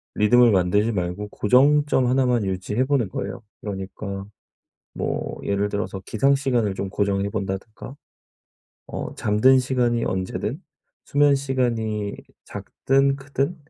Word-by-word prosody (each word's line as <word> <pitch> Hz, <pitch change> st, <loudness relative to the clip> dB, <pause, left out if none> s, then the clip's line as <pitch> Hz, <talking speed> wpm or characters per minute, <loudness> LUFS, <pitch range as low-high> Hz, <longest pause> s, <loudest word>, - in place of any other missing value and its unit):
리듬을 120 Hz, +3 st, +5 dB
만들지 100 Hz, +4 st, +2 dB
말고 95 Hz, +1 st, -3 dB
고정점 135 Hz, +5 st, +3 dB
1 130 Hz, +1 st, +2 dB
만 120 Hz, -4 st, +1 dB
유지해 95 Hz, +6 st, -1 dB
보는 130 Hz, -7 st, +1 dB
거예요. 120 Hz, +5 st, -5 dB, 0.2 s
그러니까 100 Hz, 0 st, -6 dB, 0.7 s
뭐 -, -, -3 dB
예를 100 Hz, +1 st, 0 dB
들어서 100 Hz, -1 st, -4 dB
기상 135 Hz, +5 st, +2 dB
시간을 125 Hz, -7 st, 0 dB
좀 100 Hz, 0 st, -4 dB
고정해 100 Hz, 0 st, 0 dB
본다든가. 100 Hz, +5 st, -5 dB, 0.9 s
어 -, -, -6 dB
잠든 110 Hz, +6 st, +4 dB
시간이 125 Hz, -2 st, 0 dB
언제든 95 Hz, -, -3 dB, 0.5 s
수면시간이 125 Hz, -7 st, +1 dB, 0.3 s
작든 135 Hz, +1 st, 0 dB
크든 140 Hz, +4 st, -2 dB
110 Hz, 265 characters per minute, -23 LUFS, 100-130 Hz, 0.9 s, 리듬을